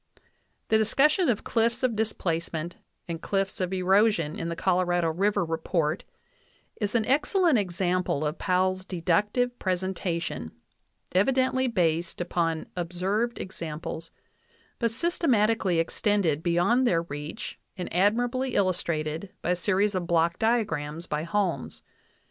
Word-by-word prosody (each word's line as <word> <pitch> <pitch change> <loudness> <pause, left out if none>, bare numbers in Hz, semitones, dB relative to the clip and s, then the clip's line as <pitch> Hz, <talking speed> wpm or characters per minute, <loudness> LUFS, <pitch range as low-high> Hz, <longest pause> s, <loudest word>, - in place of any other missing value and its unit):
The 220 - +4
discussion 300 - +3
of 220 - 0
cliffs 230 +2 +1
of 245 -3 +2
displacement 170 -6 -2 0.3
and 165 -1 -5
cliffs 195 -1 -1
of 180 0 -1
erosion 190 -3 +2
in 165 - -3
the 170 - -3
Colorado 175 -1 +1
River 195 +3 +1
report 165 0 -1 0.7
is 205 +1 -2
an 225 -2 +2
excellent 300 - +3
example 180 -4 0
of 150 +2 -3
Pow 185 0 +2
ell's 185 0 -1
deductive 210 +7 0
presentation, 180 - -2 0.6
evidently 260 +6 +2
based 170 -6 0
upon 165 -2 -1
observed 185 +7 -1
ex 190 - -7
amples, 160 0 -5 0.7
but 235 - +2
systematically 225 - +2
extended 165 -2 +1
beyond 175 +9 +2
their 165 -6 +2
reach 150 +5 -7 0.2
and 180 - -4
admirably 240 +7 +1
illustrated 170 -2 0
by 175 - +1
a - - +3
series 200 +3 +1
of 180 -2 -2
block 170 0 +2
diagrams 170 -9 0
by 150 0 -2
Holmes. 170 -4 -2
185 Hz, 125 wpm, -27 LUFS, 170-220 Hz, 0.7 s, The